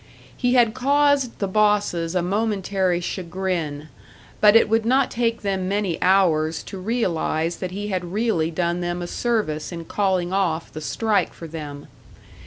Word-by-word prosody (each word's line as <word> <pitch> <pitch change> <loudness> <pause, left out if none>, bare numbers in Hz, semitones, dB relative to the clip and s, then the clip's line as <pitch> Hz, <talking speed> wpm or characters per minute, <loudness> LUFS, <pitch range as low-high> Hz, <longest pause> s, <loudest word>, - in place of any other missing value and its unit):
He 245 0 +1
had 235 -3 +4
caused 280 -1 +2
the 200 - -1
bosses 200 -4 +1
a 180 - +1
momentary 195 -2 0
chagrin; 170 -5 -3 0.5
but 210 0 +6
it 225 - +6
would 225 +1 +2
not 260 +3 +2
take 230 -1 -1
them 190 -2 -1
many 195 -3 -1
hours 165 -4 +2
to 195 - -8
realise 175 -6 -1
that 185 - -4
he 205 +3 -5
had 185 -2 -2
really 205 -6 0
done 175 +1 -1
them 175 0 -3
a - - -5
service 205 -10 -1
in 170 -1 -6
calling 185 -2 0
off 170 -5 -1
the 155 - -6
strike 215 +5 0
for 165 - -9
them. 150 -3 -7
190 Hz, 160 wpm, -23 LUFS, 170-215 Hz, 0.5 s, but